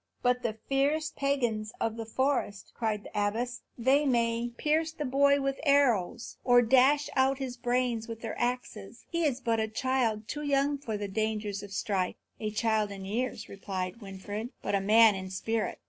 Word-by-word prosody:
"But 250 Hz, 0 st, +2 dB
the 220 Hz, -3 st, -2 dB
fierce 295 Hz, +3 st, +1 dB
pagans 240 Hz, -6 st, 0 dB
of 225 Hz, -1 st, -1 dB
the 225 Hz, -1 st, -6 dB
forest," 245 Hz, -5 st, -1 dB
cried 215 Hz, -3 st, -1 dB
the -, -, -11 dB
abbess, 225 Hz, +5 st, -1 dB, 0.2 s
"they 265 Hz, +5 st, +3 dB
may 235 Hz, -3 st, +1 dB
pierce 315 Hz, +1 st, +1 dB
the 310 Hz, -2 st, -5 dB
boy 280 Hz, +2 st, +4 dB
with 275 Hz, 0 st, -1 dB
their -, -, -7 dB, 0.2 s
arrows, 205 Hz, 0 st, -3 dB
or 245 Hz, -1 st, +6 dB
dash 265 Hz, +5 st, +4 dB
out 265 Hz, 0 st, +3 dB
his 265 Hz, -2 st, -4 dB
brains 245 Hz, -2 st, 0 dB
with 230 Hz, -1 st, -7 dB
their 225 Hz, -, -4 dB
axes. 240 Hz, -3 st, -3 dB
He 335 Hz, -1 st, +1 dB
is 270 Hz, -4 st, 0 dB
but 230 Hz, -2 st, +1 dB
a 220 Hz, -, 0 dB
child, 225 Hz, -2 st, 0 dB
too 295 Hz, +7 st, -4 dB
young 285 Hz, 0 st, +1 dB
for 225 Hz, -6 st, -4 dB
the 205 Hz, 0 st, -4 dB
dangers 210 Hz, -1 st, -2 dB
of 205 Hz, -1 st, -10 dB
strife." 195 Hz, -2 st, -1 dB, 0.2 s
"A 215 Hz, -, -2 dB
child 215 Hz, -1 st, +1 dB
in 195 Hz, -1 st, -7 dB
years," 220 Hz, +2 st, -3 dB
replied 190 Hz, +1 st, -5 dB
Winfried, 205 Hz, +3 st, -6 dB
"but -, -, -2 dB
a 200 Hz, -, +2 dB
man 220 Hz, +2 st, +6 dB
in 190 Hz, -1 st, -5 dB
spirit. 220 Hz, +4 st, -2 dB
230 Hz, 185 wpm, -29 LUFS, 210-265 Hz, 0.2 s, or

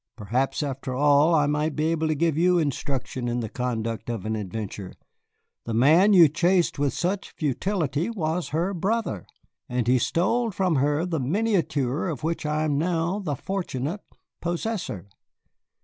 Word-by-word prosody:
"Perhaps, 125 Hz, +7 st, -1 dB
after 135 Hz, -2 st, -4 dB
all, 145 Hz, +4 st, +4 dB
I 150 Hz, -2 st, +4 dB
might 150 Hz, +1 st, 0 dB
be 155 Hz, +1 st, +1 dB
able 160 Hz, -1 st, 0 dB
to 155 Hz, -, +1 dB
give 165 Hz, 0 st, +1 dB
you 180 Hz, +3 st, +3 dB
instruction 135 Hz, -4 st, -2 dB
in 120 Hz, 0 st, -1 dB
the 110 Hz, -, -4 dB
conduct 115 Hz, -2 st, -3 dB
of 115 Hz, -5 st, -4 dB
an 110 Hz, 0 st, -1 dB
adventure. 100 Hz, -1 st, -5 dB, 0.7 s
The 115 Hz, -, -3 dB
man 160 Hz, -, +5 dB
you 175 Hz, -4 st, +8 dB
chased 175 Hz, +2 st, +1 dB
with 145 Hz, -1 st, +2 dB
such 185 Hz, +3 st, -2 dB
futility 155 Hz, -, -1 dB
was 175 Hz, -5 st, -2 dB
her 170 Hz, +5 st, -1 dB
brother, 195 Hz, -, -2 dB, 0.4 s
and 125 Hz, -1 st, -1 dB
he 125 Hz, +1 st, +4 dB
stole 230 Hz, -, +1 dB
from 185 Hz, -5 st, 0 dB
her 145 Hz, +4 st, +1 dB
the 165 Hz, -3 st, -2 dB
miniature 155 Hz, -, 0 dB
of 160 Hz, -3 st, -4 dB
which 165 Hz, -1 st, -2 dB
I 150 Hz, +1 st, 0 dB
am 145 Hz, -2 st, +1 dB
now 170 Hz, +3 st, 0 dB
the 155 Hz, -8 st, -2 dB
fortunate 175 Hz, 0 st, -3 dB, 0.4 s
possessor." 175 Hz, -, -3 dB
155 Hz, 160 wpm, -25 LUFS, 130-175 Hz, 0.7 s, you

